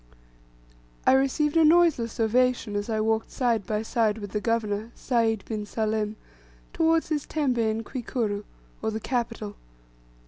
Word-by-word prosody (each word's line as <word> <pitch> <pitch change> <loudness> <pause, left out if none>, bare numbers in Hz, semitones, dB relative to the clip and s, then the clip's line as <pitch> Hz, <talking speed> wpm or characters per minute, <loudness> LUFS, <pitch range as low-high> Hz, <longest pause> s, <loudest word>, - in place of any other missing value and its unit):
I - - +6
received 275 +3 +2
a 325 - +6
noiseless 310 -9 +4
ovation 240 -1 +2
as 205 +2 -2
I 220 -1 0
walked 220 +1 0
side 235 -6 0
by 215 0 -1
side 220 -1 +1
with 205 -3 -7
the 210 - -2
governor, 220 -1 -1
Sayd 225 -4 0
bin 215 -2 -3
Salim, 215 -1 -1 0.6
towards 325 0 +2
his 300 -2 -1
tembe 275 -6 0
in 220 0 0
Kwikuru, 225 -4 -3 0.4
or 220 - 0
the 220 0 -3
capital. 230 -3 -3
225 Hz, 145 wpm, -26 LUFS, 215-255 Hz, 0.6 s, I